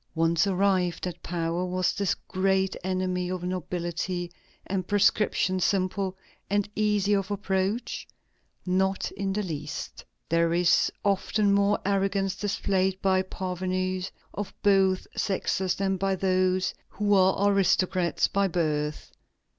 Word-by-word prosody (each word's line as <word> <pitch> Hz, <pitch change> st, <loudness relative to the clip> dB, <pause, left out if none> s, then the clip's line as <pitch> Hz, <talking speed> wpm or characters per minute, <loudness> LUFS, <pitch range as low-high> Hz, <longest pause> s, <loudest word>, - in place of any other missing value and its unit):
Once 165 Hz, +3 st, +2 dB
arrived 185 Hz, -2 st, +1 dB
at 180 Hz, -, -5 dB
power, 170 Hz, 0 st, -2 dB
was 185 Hz, 0 st, 0 dB
this 200 Hz, -2 st, 0 dB
great 190 Hz, 0 st, +1 dB
enemy 185 Hz, -1 st, -1 dB
of 185 Hz, -1 st, -3 dB
nobility 175 Hz, 0 st, -3 dB, 0.3 s
and 185 Hz, -2 st, -2 dB
prescription 200 Hz, -2 st, +2 dB
simple, 190 Hz, 0 st, 0 dB, 0.3 s
and 205 Hz, 0 st, +1 dB
easy 210 Hz, -1 st, +2 dB
of 195 Hz, -1 st, 0 dB
approach? 200 Hz, +2 st, -2 dB, 0.6 s
Not 190 Hz, +1 st, 0 dB
in 195 Hz, -1 st, -3 dB
the 210 Hz, +2 st, -1 dB
least. 150 Hz, -4 st, -6 dB, 0.2 s
There 165 Hz, 0 st, +2 dB
is 175 Hz, 0 st, +3 dB
often 200 Hz, +1 st, +2 dB
more 200 Hz, +1 st, +3 dB
arrogance 195 Hz, -1 st, +1 dB
displayed 195 Hz, -1 st, 0 dB
by 190 Hz, -1 st, +3 dB
parvenus 185 Hz, 0 st, -3 dB, 0.2 s
of 205 Hz, -1 st, -5 dB
both 195 Hz, -2 st, +3 dB
sexes 190 Hz, -1 st, 0 dB
than 195 Hz, -1 st, 0 dB
by 195 Hz, +1 st, 0 dB
those 185 Hz, 0 st, +1 dB, 0.2 s
who 205 Hz, 0 st, 0 dB
are 190 Hz, +1 st, +4 dB
aristocrats 185 Hz, -2 st, +2 dB
by 200 Hz, 0 st, +1 dB
birth. 155 Hz, -4 st, -2 dB
185 Hz, 125 wpm, -27 LUFS, 180-195 Hz, 0.6 s, are